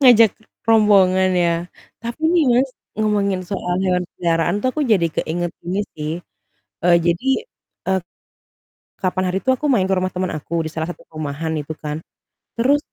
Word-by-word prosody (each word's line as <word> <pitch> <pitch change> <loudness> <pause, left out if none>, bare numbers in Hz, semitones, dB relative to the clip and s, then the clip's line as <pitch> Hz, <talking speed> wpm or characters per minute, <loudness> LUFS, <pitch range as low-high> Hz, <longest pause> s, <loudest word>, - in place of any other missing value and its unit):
Ngajak 235 -5 +7 0.4
rombongan 195 -4 +5
ya. 175 -1 +3 0.5
Tapi 235 +5 -5
nih, 340 -2 +4
Mas, 255 +3 +3 0.3
ngomongin 200 -3 +1
soal 180 -1 -3
hewan 180 -1 +1
peliharaan 170 +3 +1
tuh 255 - +1
aku 305 - -2
jadi 170 -5 +4
keinget 175 +1 -1
ini 185 +3 -1 0.2
sih, 150 0 -3 0.7
eee, 175 0 +6
jadi, 175 +9 +1 0.6
eee, 190 0 +3 1.0
kapan 185 0 0
hari 185 - 0
itu 260 - +3
aku 260 +3 -1
main 235 -9 +3
ke 195 - +1
rumah 185 0 +1
teman 185 0 -1
aku 160 +2 -2
di 160 - -4
salah 160 +1 -3
satu 175 - -8
perumahan 155 +1 -4
itu 145 +2 -6
kan. 150 0 -5 0.5
Terus, 265 +5 +3
185 Hz, 165 wpm, -20 LUFS, 170-215 Hz, 1.0 s, Ngajak